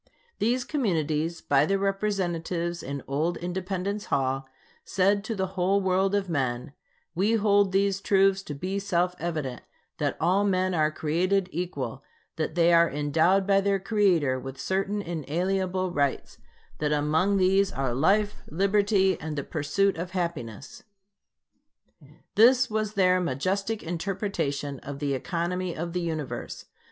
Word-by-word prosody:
These 245 +4 +1
communities, 165 - -1
by 140 -1 +3
their 195 - +2
representatives 180 -4 -1
in 140 +1 -5
old 155 +5 -1
Independence 190 +3 -3
Hall, 135 0 -1 0.3
said 200 +2 +1
to 225 - -3
the 190 -1 0
whole 190 +2 +2
world 190 +1 +1
of 200 -1 0
men: 135 -3 -2 0.4
"We 195 +6 +1
hold 205 -3 +3
these 195 0 +1
truths 195 -1 +3
to 145 - -5
be 190 +7 -3
self 180 -2 0
evident: 155 -7 -3 0.4
that - - -1
all 185 +5 +2
men 185 -2 +1
are 155 -2 +2
created 180 +5 0
equal; 175 +2 -4 0.3
that 160 0 -2
they 170 0 +4
are 170 0 +5
endowed 160 +7 +2
by 195 0 +4
their 200 0 +2
Creator 185 - +2
with 135 0 -8
certain 195 +5 -1
inalienable 185 +3 -1
rights; 140 -5 -1 0.4
that 150 -1 0
among 155 +7 +2
these 195 +1 +3
are 135 -6 -2
life, 205 - +2
liberty, 195 +2 +2
and 155 -1 -5
the 140 - -2
pursuit 165 +7 0
of 180 +2 -5
happiness." 140 - -4 1.5
This 245 +3 +5
was 215 0 -1
their 185 -1 +4
majestic 190 +9 -1
interpretation 165 -6 -3
of 140 0 -7
the 140 -1 -1
economy 175 +5 -2
of 170 +1 -4
the 180 - -1
Universe. 160 -5 -4
180 Hz, 140 wpm, -27 LUFS, 155-195 Hz, 1.5 s, are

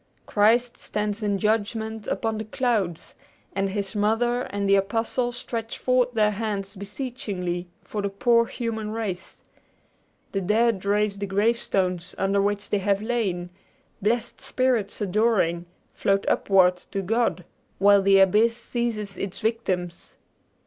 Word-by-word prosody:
Christ 235 +4 +2
stands 210 +1 -3
in 205 -2 0
judgment 220 +1 -1
upon 225 -2 -1
the 220 - -4
clouds, 215 - -1 0.4
and 195 0 0
his 200 +1 -3
Mother 225 +4 +1
and 200 0 -2
the 195 - +4
Apostles 225 +5 0
stretch 230 -2 -5
forth 250 -1 +2
their 210 -2 +3
hands 205 -2 -3
beseechingly 200 -5 -4 0.2
for 210 - -4
the 200 - -1
poor 235 +4 +3
human 220 -3 -4
race. 210 -5 -5 0.9
The 195 - -1
dead 210 +1 +2
raise 205 0 +1
the 200 - -3
gravestones 195 -4 0
under 195 +1 +2
which 205 0 -1
they 205 - +2
have 200 +1 0
lain; 195 -7 -1 0.5
blessed 225 +3 -1
spirits 245 -6 0
adoring, 195 -4 +1 0.3
float 195 0 +1
upward 185 -2 +4
to 195 +2 -5
God, 225 -3 0 0.3
while 200 +1 +6
the 195 0 +5
abyss 215 +5 +4
seizes 230 -5 -3
its 195 -1 -4
victims. 190 -6 -2
210 Hz, 135 wpm, -25 LUFS, 195-230 Hz, 0.9 s, while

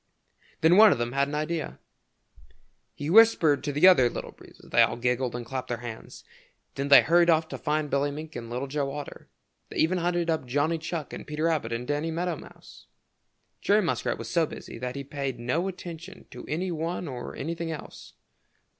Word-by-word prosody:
Then 165 +3 +5
one 215 -1 +9
of - - +2
them 120 0 -2
had 140 +2 +1
an 145 - -4
idea. 155 +2 -3 1.2
He 145 - -5
whispered 180 -9 +5
to 145 - -2
the 145 +6 +5
other 130 -10 +6
Little - - -6
Breezes. - - -17
They - - +5
all - - +3
giggled 125 +1 -1
and 120 -1 -5
clapped 130 +2 -5
their 120 - -2
hands. 115 -2 -9 0.5
Then 140 +1 -3
they 140 - +8
hurried 170 +1 +4
off 160 -1 +3
to - - -5
find 150 0 -1
Billy 140 +1 +1
Mink 155 +2 -8
and 115 -1 -6
Little 125 +3 -3
Joe 140 0 -2
Otter. 145 0 -8 0.4
They - - -8
even 180 +3 +2
hunted 175 0 0
up 160 -6 -1
Johnny 145 +6 0
Chuck 155 -2 -5
and - - -8
Peter 150 +1 -4
Rabbit 155 -8 0
and 115 +1 -3
Danny 145 +2 -1
Meadow 170 +1 -2
Mouse. - - -15 0.7
Jerry 210 +1 +3
Muskrat 170 - -1
was - - -7
so 170 -3 +1
busy 115 - -9
that 125 +1 -4
he 140 - -4
paid 140 -2 -4
no 130 +10 -1
attention 180 -1 -8
to - - -10
any 180 +4 -2
one 170 +2 -3
or 125 -3 -6
anything 165 +2 -4
else. 160 -3 -9
150 Hz, 200 wpm, -27 LUFS, 135-170 Hz, 1.2 s, one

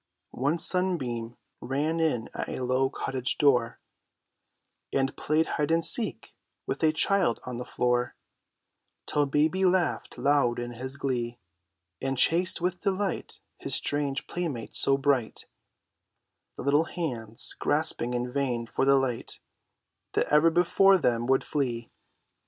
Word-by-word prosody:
One 145 +6 0
sunbeam 130 -11 0 0.2
ran 150 +5 -1
in 150 -9 0
at - - -4
a 130 - -4
low 130 +1 +1
cottage 130 -2 -3
door, 125 -5 +2 1.1
And 135 0 0
played 155 +1 +1
"hide 150 0 -2
and 165 0 +2
seek" 230 -3 +1 0.3
with - - -3
a 160 -1 +4
child 160 -5 +2
on 125 -1 -5
the 125 - -5
floor, 125 0 0 0.9
Till 145 -1 +1
baby 155 +7 +1
laughed 185 -2 +1
loud 140 -4 +2
in 120 0 -4
his 130 +3 -6
glee, 120 -4 -2 0.6
And 135 0 -2
chased 175 +9 +3
with 180 0 -1
delight 195 -2 -2 0.2
his - - -2
strange 145 -1 -1
playmate 150 -11 -4
so 135 0 +3
bright, 135 -5 0 1.1
The - - -6
little 145 +4 +3
hands 120 -11 -4
grasping 145 -5 0
in 125 0 -3
vain 125 -4 -1
for 125 - -1
the 140 0 +5
light 130 -3 -2 0.7
That - - +2
ever 150 +2 +6
before 180 +3 +4
them 120 -7 0
would 130 0 +3
flee. 120 -6 -3
140 Hz, 135 wpm, -27 LUFS, 125-160 Hz, 1.1 s, ever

